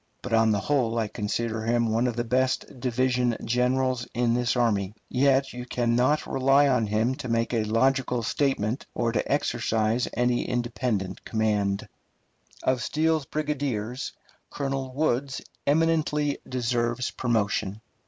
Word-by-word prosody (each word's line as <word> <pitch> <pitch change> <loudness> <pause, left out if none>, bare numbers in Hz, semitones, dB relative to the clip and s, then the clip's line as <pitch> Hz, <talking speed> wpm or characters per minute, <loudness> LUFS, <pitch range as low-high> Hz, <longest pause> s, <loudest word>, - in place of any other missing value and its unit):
But 125 - -4
on 115 0 +4
the 105 -2 +1
whole 120 -3 +1
I 110 -2 +1
consider 110 +2 -2
him 115 0 +1
one 115 +3 +2
of 120 - -2
the 120 - -1
best 130 +2 0
division 125 -1 +1
generals 125 0 +1
in 120 -1 +2
this 120 0 +1
army, 105 -5 +1
yet 135 +1 +2
you 125 0 -6
can 120 -1 0
not 130 +5 +2
rely 135 +2 +4
on 125 -5 +2
him 110 +4 +1
to 145 - -6
make 115 +1 0
a 115 -2 +2
logical 125 +2 +1
statement, 130 -3 0
or 115 -1 +1
to 115 - -1
exercise 115 +2 +1
any 120 +1 +1
independent 120 -5 -2
command. 105 -3 0 0.8
Of 130 -1 +1
Steele's 155 +1 0
brigadiers, 135 -6 -2 0.4
Colonel 135 -2 -3
Woods 135 -1 0 0.3
eminently 150 -1 +2
deserves 120 -1 -1
promotion. 105 -4 -1
120 Hz, 140 wpm, -26 LUFS, 115-130 Hz, 0.8 s, on